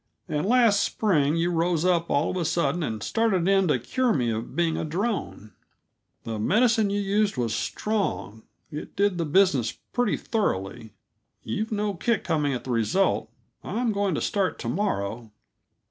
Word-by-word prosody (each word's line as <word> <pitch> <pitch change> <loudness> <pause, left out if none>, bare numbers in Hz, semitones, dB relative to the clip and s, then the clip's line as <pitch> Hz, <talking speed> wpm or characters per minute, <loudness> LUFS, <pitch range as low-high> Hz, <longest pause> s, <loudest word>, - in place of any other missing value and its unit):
"And 155 +2 -1
last 230 -4 +4
spring 155 -8 +1
you 170 +1 +1
rose 170 0 +1
up, 170 -2 +2
all 145 +2 +1
of - - -4
a 175 - 0
sudden, 165 0 0
and 110 -8 -3
started 200 -6 +1
in 195 -1 +3
to 150 - +3
cure 230 - 0
me 120 -4 0
of 110 +1 -5
being 165 -1 +1
a - - -2
drone. 170 - -3 0.7
The 110 -2 -4
medicine 220 - +3
you 200 +1 0
used 205 -2 +1
was 115 -3 -1
strong; 110 - -2 0.3
it 150 - -7
did 200 -2 +1
the 165 - 0
business 150 - +3 0.2
pretty 245 0 +1
thoroughly. 110 - -2 0.5
You've 215 - -3
no 210 -1 -1
kick 215 +4 0
coming 150 -3 0
at 125 - -3
the 130 - -5
result. 120 - +1 0.3
I'm 235 0 -1
going 200 -4 0
to - - -2
start 195 -2 0
to - - -6
morrow." 115 - -2
175 Hz, 170 wpm, -25 LUFS, 125-205 Hz, 0.7 s, last